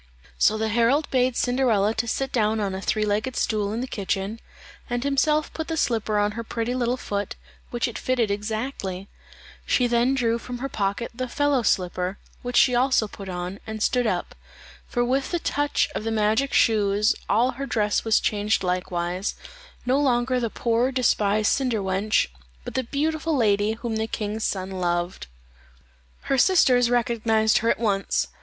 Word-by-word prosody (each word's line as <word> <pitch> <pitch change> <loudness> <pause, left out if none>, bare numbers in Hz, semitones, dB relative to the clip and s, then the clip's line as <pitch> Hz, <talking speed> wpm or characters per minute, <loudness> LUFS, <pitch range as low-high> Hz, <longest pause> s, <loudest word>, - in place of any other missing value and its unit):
So 215 - +4
the 220 0 -1
herald 240 +7 +2
bade 255 -1 +2
Cinderella 240 -5 +2
sit 250 +3 -1
down 220 -2 +1
on 200 -2 -1
a 190 - -4
three 215 +1 0
legged 215 +5 -1
stool 210 -2 0
in 225 +3 -2
the 255 - -3
kitchen, 200 0 -3 0.5
and 245 0 -1
himself 300 +2 +1
put 320 - -4
the 325 - -3
slipper 220 -6 0
on 205 0 +2
her 230 +2 -5
pretty 230 +1 -3
little 250 0 0
foot, 205 -5 -4 0.3
which 240 +1 -1
it 235 - -6
fitted 240 -5 0
exactly; 205 -2 -4 0.5
she 250 - +2
then 240 +2 +2
drew 235 -3 +1
from 245 +1 -6
her 270 +3 -4
pocket 200 +2 -2
the 255 +2 -4
fellow 290 0 +1
slipper, 185 -2 0 0.2
which 245 0 -2
she 250 - +5
also 245 -2 +3
put 195 -1 -9
on, 180 +2 -5
and 220 0 -3
stood 250 -2 +2
up - - -2 0.5
for 240 -1 0
with 265 +2 0
the 350 - 0
touch 290 0 0
of - - -3
the 225 - -2
magic 220 +5 +1
shoes 210 -2 +3 0.2
all 235 +5 +3
her 275 +2 -6
dress 210 -4 +1
was 225 -1 +3
changed 210 0 0
likewise 180 +1 -2 0.5
no 260 +3 +2
longer 255 -2 +2
the 235 -2 -1
poor 235 +3 0
despised 215 -5 +2
cinder 255 -4 +1
wench, 195 +2 +1 0.4
but - - -6
the 260 - 0
beautiful 310 +3 -1
lady 210 -2 +2
whom 225 0 -4
the 220 0 -1
king's 215 0 -3
son 190 -1 -2
loved. 175 - -2 0.9
Her 270 - 0
sisters 250 -8 +4
recognized 230 -2 +2
her 230 - 0
at - - +2
once. 200 -4 0
230 Hz, 175 wpm, -24 LUFS, 205-255 Hz, 0.9 s, she